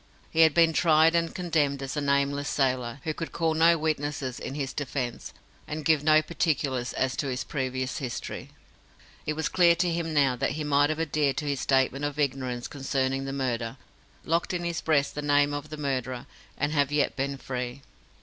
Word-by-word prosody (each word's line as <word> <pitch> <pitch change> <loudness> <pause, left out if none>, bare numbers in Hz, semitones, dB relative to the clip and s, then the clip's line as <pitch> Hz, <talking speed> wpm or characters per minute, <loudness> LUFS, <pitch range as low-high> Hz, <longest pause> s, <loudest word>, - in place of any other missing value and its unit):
He 160 - -2
had 160 -2 +6
been 165 -1 +5
tried 160 0 +5
and 170 -1 0
condemned 150 -6 0
as 135 - -4
a 150 - -1
nameless 140 0 +1
sailor, 130 -2 0
who 155 - -2
could 165 +1 -5
call 165 -1 0
no 165 +1 +5
witnesses 145 -4 -2
in 135 - -5
his 135 -2 -3
defence, 130 -4 -4 0.4
and 150 0 -5
give 155 -2 +3
no 155 0 +5
particulars 145 -6 -1
as 130 0 0
to 140 - -1
his 130 -1 -2
previous 130 +1 -3
history. 125 -5 -5 0.8
It 155 - +1
was 160 +1 -1
clear 175 -2 +5
to 175 0 +1
him 165 -1 -2
now 140 -4 +3
that - - 0
he 155 +1 -3
might 145 0 +3
have 155 0 -2
adhered 150 -4 0
to 150 - -2
his 140 -2 -1
statement 135 +1 +1
of 145 0 -2
ignorance 130 -4 -1
concerning 135 -1 -1
the 135 - -3
murder, 125 -3 -2 0.5
locked 170 +2 0
in 175 - -2
his 170 -1 -2
breast 145 -3 +2
the 150 - -4
name 145 0 +3
of 145 +1 -5
the 155 - -7
murderer, 130 -4 -3 0.3
and 150 - 0
have 145 -2 +1
yet 150 -1 +1
been 140 +1 -2
free. 125 0 -5
145 Hz, 200 wpm, -27 LUFS, 135-155 Hz, 0.8 s, had